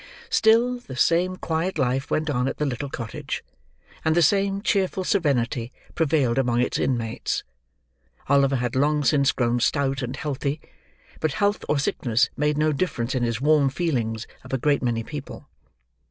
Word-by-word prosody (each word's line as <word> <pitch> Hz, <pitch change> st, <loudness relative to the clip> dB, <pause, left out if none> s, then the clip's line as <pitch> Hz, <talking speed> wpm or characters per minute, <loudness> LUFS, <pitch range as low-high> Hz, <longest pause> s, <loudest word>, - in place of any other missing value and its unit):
Still, 235 Hz, +3 st, +4 dB
the 135 Hz, -, -10 dB
same 175 Hz, +7 st, +2 dB
quiet 165 Hz, +1 st, -2 dB
life 135 Hz, 0 st, 0 dB
went 155 Hz, +1 st, 0 dB
on 130 Hz, -4 st, 0 dB
at -, -, -3 dB
the 150 Hz, -, 0 dB
little 135 Hz, +1 st, -3 dB
cottage, 115 Hz, -4 st, -5 dB, 0.6 s
and 160 Hz, 0 st, +2 dB
the 175 Hz, -, +4 dB
same 195 Hz, +3 st, +2 dB
cheerful 190 Hz, -3 st, +1 dB
serenity 130 Hz, -, 0 dB, 0.2 s
prevailed 140 Hz, -6 st, +1 dB
among 120 Hz, -2 st, +1 dB
its 125 Hz, -, 0 dB
inmates. 115 Hz, -4 st, -1 dB, 0.8 s
Oliver 140 Hz, 0 st, +3 dB
had 125 Hz, -1 st, -2 dB
long 150 Hz, +2 st, +2 dB
since 140 Hz, 0 st, +3 dB
grown 120 Hz, -1 st, 0 dB
stout 135 Hz, +2 st, +1 dB
and 125 Hz, +1 st, -4 dB
healthy; 140 Hz, +1 st, -3 dB, 0.6 s
but 155 Hz, -3 st, 0 dB
health 205 Hz, +5 st, 0 dB
or 150 Hz, -, +2 dB
sickness 120 Hz, -3 st, +1 dB
made 150 Hz, +1 st, 0 dB
no 155 Hz, +1 st, +2 dB
difference 130 Hz, -7 st, -2 dB
in 130 Hz, -, 0 dB
his 115 Hz, -2 st, -1 dB
warm 150 Hz, -1 st, +4 dB
feelings 125 Hz, -7 st, -2 dB, 0.2 s
of -, -, -12 dB
a 135 Hz, -, +1 dB
great 145 Hz, +3 st, +1 dB
many 115 Hz, -2 st, -1 dB
people. 145 Hz, +3 st, -8 dB
140 Hz, 165 wpm, -24 LUFS, 125-160 Hz, 0.8 s, Still